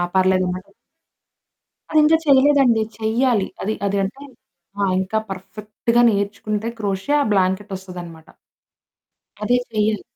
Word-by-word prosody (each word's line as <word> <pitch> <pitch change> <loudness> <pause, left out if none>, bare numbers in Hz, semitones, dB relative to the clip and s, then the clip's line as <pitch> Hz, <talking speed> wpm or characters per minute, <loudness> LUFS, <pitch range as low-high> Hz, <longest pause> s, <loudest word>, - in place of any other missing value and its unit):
పర్లేదమాట. 185 - +1 1.2
అది 310 - +4
ఇంకా 320 +2 +5
చేయలేదండి. 270 -4 +4 0.2
చెయ్యాలి. 225 -1 +1
అది, 215 +2 -1
అది 200 0 -1
అంటే, 265 +9 -5 0.6
ఆ! - - +2 0.2
ఇంకా 190 +4 -1
పర్ఫెక్ట్‌గా 210 +5 -2
నేర్చుకుంటే 205 +1 -2
క్రోచెట్ 205 +8 0
ఆ - - +3
బ్లాంకెట్ 190 +1 0
వొస్తదనమాట. 175 -4 -10 1.2
అదే 245 +3 +3
చెయ్యాలి. 215 -1 0
210 Hz, 105 wpm, -21 LUFS, 190-235 Hz, 1.2 s, ఇంకా